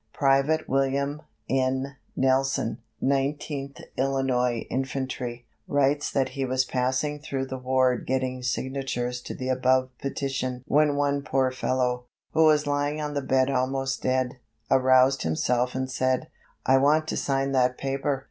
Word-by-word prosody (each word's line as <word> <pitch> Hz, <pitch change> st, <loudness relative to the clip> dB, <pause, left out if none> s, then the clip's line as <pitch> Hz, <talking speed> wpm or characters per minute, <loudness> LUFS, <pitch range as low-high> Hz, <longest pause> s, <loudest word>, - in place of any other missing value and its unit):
Private 140 Hz, +3 st, +2 dB
William 140 Hz, +2 st, 0 dB, 0.3 s
N. 130 Hz, +1 st, 0 dB, 0.2 s
Nelson, 135 Hz, -2 st, +1 dB, 0.2 s
Nineteenth 140 Hz, 0 st, -1 dB, 0.2 s
Illinois 130 Hz, -3 st, +1 dB
Infantry, 130 Hz, -2 st, -3 dB, 0.2 s
writes 145 Hz, +1 st, +2 dB
that 135 Hz, -2 st, 0 dB
he 135 Hz, +1 st, -3 dB
was 130 Hz, 0 st, +1 dB
passing 130 Hz, +4 st, -1 dB
through 135 Hz, -3 st, -3 dB
the 130 Hz, 0 st, -6 dB
ward 130 Hz, -1 st, +1 dB
getting 130 Hz, -1 st, -1 dB
signatures 125 Hz, -1 st, -2 dB
to -, -, -7 dB
the 130 Hz, 0 st, -4 dB
above 130 Hz, 0 st, +2 dB
petition 135 Hz, -2 st, -3 dB
when 150 Hz, 0 st, +3 dB
one 140 Hz, 0 st, +1 dB
poor 135 Hz, -2 st, +1 dB
fellow, 125 Hz, -1 st, -1 dB, 0.3 s
who 160 Hz, -, +4 dB
was 150 Hz, -1 st, +4 dB
lying 145 Hz, +1 st, 0 dB
on 150 Hz, -1 st, -3 dB
the 145 Hz, -, -1 dB
bed 130 Hz, 0 st, +2 dB
almost 135 Hz, +1 st, -1 dB
dead, 130 Hz, 0 st, 0 dB, 0.3 s
aroused 130 Hz, 0 st, +5 dB
himself 125 Hz, +11 st, 0 dB
and 130 Hz, 0 st, -2 dB
said: 130 Hz, 0 st, 0 dB, 0.4 s
"I 135 Hz, 0 st, +5 dB
want 155 Hz, +3 st, +3 dB
to -, -, -1 dB
sign 135 Hz, 0 st, 0 dB
that 125 Hz, -1 st, +2 dB
paper. 135 Hz, 0 st, -1 dB
130 Hz, 140 wpm, -26 LUFS, 130-140 Hz, 0.4 s, aroused